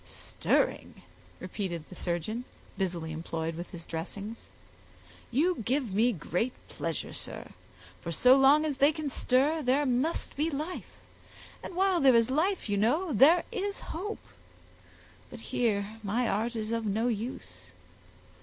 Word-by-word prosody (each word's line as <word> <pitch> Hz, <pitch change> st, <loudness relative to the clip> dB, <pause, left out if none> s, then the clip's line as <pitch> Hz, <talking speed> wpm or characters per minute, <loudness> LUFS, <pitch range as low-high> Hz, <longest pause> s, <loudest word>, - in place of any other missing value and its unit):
"Stirring!" -, -, -1 dB, 0.4 s
repeated 175 Hz, -6 st, -4 dB
the -, -, -12 dB
surgeon, 180 Hz, +8 st, -2 dB, 0.3 s
busily 175 Hz, -4 st, -2 dB
employed 160 Hz, 0 st, -3 dB
with 170 Hz, +2 st, -7 dB
his 170 Hz, -3 st, -9 dB
dressings; 200 Hz, +7 st, -6 dB, 0.8 s
"you 295 Hz, +3 st, +1 dB
give 250 Hz, -3 st, 0 dB
me 230 Hz, +5 st, +4 dB
great 195 Hz, +5 st, -2 dB, 0.2 s
pleasure, -, -, -4 dB
sir; -, -, -5 dB, 0.5 s
for 170 Hz, -, -4 dB
so 250 Hz, +10 st, +6 dB
long 275 Hz, +3 st, +6 dB
as 290 Hz, -3 st, -2 dB
they 285 Hz, +2 st, +5 dB
can 305 Hz, -2 st, -4 dB
stir 280 Hz, +7 st, +2 dB
there 275 Hz, +2 st, +2 dB
must 260 Hz, +6 st, 0 dB
be 305 Hz, +3 st, +1 dB
life; 310 Hz, +4 st, -5 dB, 0.6 s
and 360 Hz, -, -8 dB
while 380 Hz, -1 st, +3 dB
there 265 Hz, -4 st, +6 dB
is 230 Hz, +2 st, +4 dB
life, 345 Hz, +5 st, +1 dB
you 205 Hz, -1 st, 0 dB
know, 295 Hz, -, +2 dB
there 300 Hz, -, +6 dB
is 405 Hz, -3 st, -2 dB
hope; 410 Hz, +6 st, -5 dB, 1.0 s
but -, -, -9 dB
here 215 Hz, -2 st, -1 dB
my 225 Hz, +4 st, 0 dB
art 225 Hz, +4 st, 0 dB
is 220 Hz, 0 st, -2 dB
of 230 Hz, 0 st, -1 dB
no 220 Hz, +3 st, 0 dB
use. 205 Hz, -, -5 dB
240 Hz, 145 wpm, -29 LUFS, 200-295 Hz, 1.0 s, so